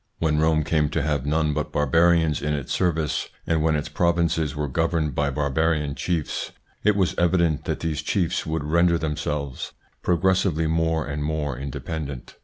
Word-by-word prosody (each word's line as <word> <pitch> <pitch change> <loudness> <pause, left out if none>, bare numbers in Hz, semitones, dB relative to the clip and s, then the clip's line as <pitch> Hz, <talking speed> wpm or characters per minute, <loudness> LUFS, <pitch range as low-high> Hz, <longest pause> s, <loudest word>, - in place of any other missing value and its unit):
When 75 -2 +1
Rome 80 0 +3
came 75 -1 +1
to - - -1
have 75 -3 -1
none 75 0 +1
but 75 -1 -2
Barbarians 80 +1 +3
in 75 +1 0
its 70 -3 -4
service, 80 -5 0 0.2
and 80 -1 +1
when 80 0 +2
its 75 0 -2
provinces 80 -2 +1
were 75 0 -2
governed 80 0 0
by 70 +1 +1
barbarian 75 +1 0
chiefs, 80 0 -2 0.3
it 105 -1 +4
was 95 -3 +2
evident 85 -4 +2
that 80 - -2
these 80 -2 -2
chiefs 85 +2 0
would 80 -1 -2
render 85 +3 +3
themselves 75 -3 -3 0.3
progressively 90 -1 +2
more 80 0 +1
and 75 +1 -3
more 75 -3 -2
independent. 70 +1 -6
80 Hz, 165 wpm, -24 LUFS, 75-80 Hz, 0.3 s, it